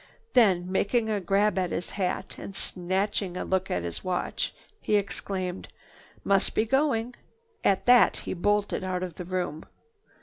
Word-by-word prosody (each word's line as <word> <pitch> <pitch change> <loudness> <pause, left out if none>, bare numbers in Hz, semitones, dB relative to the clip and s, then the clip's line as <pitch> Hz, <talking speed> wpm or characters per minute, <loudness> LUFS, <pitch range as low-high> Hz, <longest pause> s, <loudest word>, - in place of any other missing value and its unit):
Then, 185 -6 +4
making 220 +3 +1
a 205 -2 0
grab 195 +2 +2
at 180 -1 0
his 175 - -3
hat, 185 -3 -3
and 195 - -8
snatching 190 +1 -1
a - - -3
look 190 0 0
at 90 - -1
his 85 -1 -4
watch, 185 -1 -2 0.3
he 210 - +1
exclaimed: 190 -2 -2 0.6
"Must 195 -1 +2
be 215 - +3
going!" 250 -2 +1 0.5
At 195 -1 +2
that 245 0 +6
he - - -4
bolted 205 +2 0
out 185 -1 -2
of 180 -2 -4
the 180 - -5
room. 180 -4 -3
190 Hz, 160 wpm, -27 LUFS, 180-210 Hz, 0.6 s, that